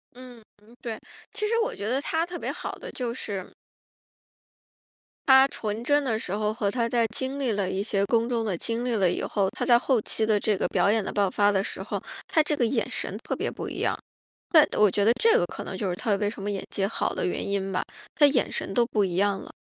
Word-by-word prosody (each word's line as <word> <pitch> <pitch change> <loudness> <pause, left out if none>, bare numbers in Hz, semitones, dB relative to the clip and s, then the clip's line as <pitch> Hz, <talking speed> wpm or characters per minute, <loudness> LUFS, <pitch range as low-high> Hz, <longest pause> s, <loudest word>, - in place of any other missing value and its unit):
嗯 250 -2 -12 0.2
嗯， 230 +3 -19
对， 225 -2 -5 0.3
其 425 - -1
实 460 +2 +1
我 - - -2
觉 205 - -4
得 260 +4 +1
她 320 +3 0
特 350 0 -6
别 - - -3
好 - - -5
的 - - -8
就 245 -2 -3
是 200 -6 -5 1.8
她 265 0 +8
纯 220 0 -4
真 290 +2 +3
的 230 -5 0
时 190 - -5
候 210 0 -1
和 205 -3 0
她 235 +1 0
在 235 -1 +2
经 265 +2 -2
历 260 -5 0
了 200 -3 -1
一 195 - -1
些 200 -2 0
宫 230 +1 +2
中 235 -2 -1
的 205 -6 -1
经 230 +6 -2
历 245 -2 -1
了 190 -5 +3
以 - - -2
后， 195 -2 0
她 - - -7
在 240 -2 +5
后 250 -1 +1
期 220 +1 0
的 215 -1 +2
这 210 -1 +1
个 - - 0
表 - - +2
演 220 -1 +1
的 - - -4
爆 200 -1 +2
发 205 +2 +2
的 195 -1 +2
时 - - -5
候， - - -4 0.2
她 315 - +3
这 300 0 -1
个 245 - +2
眼 225 - 0
神 - - -2
特 - - -3
别 - - -2
不 - - -6
一 - - -6
样。 - - +1 0.6
但 310 -3 +7
我 210 -1 +5
觉 200 - 0
得 220 - +5
这 455 - +4
个 - - +1
可 - - -7
能 - - -6
就 205 - -2
是 180 - -2
她 215 -1 0
为 205 +1 0
什 205 -1 -7
么 205 - -2
演 200 -2 -3
技 195 - -1
好 220 - -2
的 - - -2
原 180 - -2
因 195 -1 -1
吧， 185 - 0 0.3
她 295 - +6
眼 275 -3 +1
神 195 - -3
都 240 - +4
不 220 -3 0
一 180 -3 -1
样 200 0 +1
了。 - - -11
225 Hz, 280 characters per minute, -26 LUFS, 200-255 Hz, 1.8 s, 她